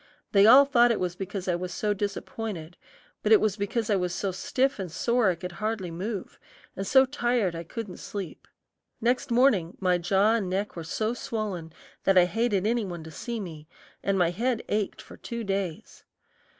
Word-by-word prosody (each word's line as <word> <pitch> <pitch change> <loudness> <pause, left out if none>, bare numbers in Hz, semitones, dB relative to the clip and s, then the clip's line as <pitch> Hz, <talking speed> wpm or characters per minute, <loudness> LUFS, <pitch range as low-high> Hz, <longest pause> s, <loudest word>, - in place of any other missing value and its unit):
They 200 0 +6
all 270 +5 +9
thought 240 -3 +5
it 230 - +1
was 180 -1 -2
because 190 0 -5
I 180 - +2
was 180 +1 -3
so 210 +3 0
disappointed, 200 -3 -5 0.5
but 210 - 0
it 220 - +8
was 215 -3 +1
because 210 +2 -2
I - - +4
was 180 -2 -1
so 195 - -1
stiff 255 +8 0
and 185 -4 -4
sore 235 +5 +2
I 180 - +1
could 180 +2 -7
hardly 210 -1 -3
move, 190 +3 -5 0.4
and 195 0 -4
so 265 +3 +6
tired 240 -8 0
I 165 - -5
couldn't 200 +2 -7
sleep. 195 -6 -7 0.5
Next 245 +3 +1
morning 235 -9 +3
my 180 -2 +2
jaw 195 +5 +3
and 210 -5 0
neck 195 +3 -2
were 170 - -5
so 215 +7 -1
swollen 210 -9 -4 0.3
that 195 -1 +4
I 180 - +7
hated 210 0 0
any 235 +1 +1
one 175 -4 -6
to 160 - -10
see 235 +9 -5
me, 160 -6 -8 0.3
and 195 -1 0
my 175 -2 +3
head 235 +5 -1
ached 210 -1 -1
for - - -13
two 235 -1 -5
days. 195 0 -4
200 Hz, 195 wpm, -27 LUFS, 180-225 Hz, 0.5 s, all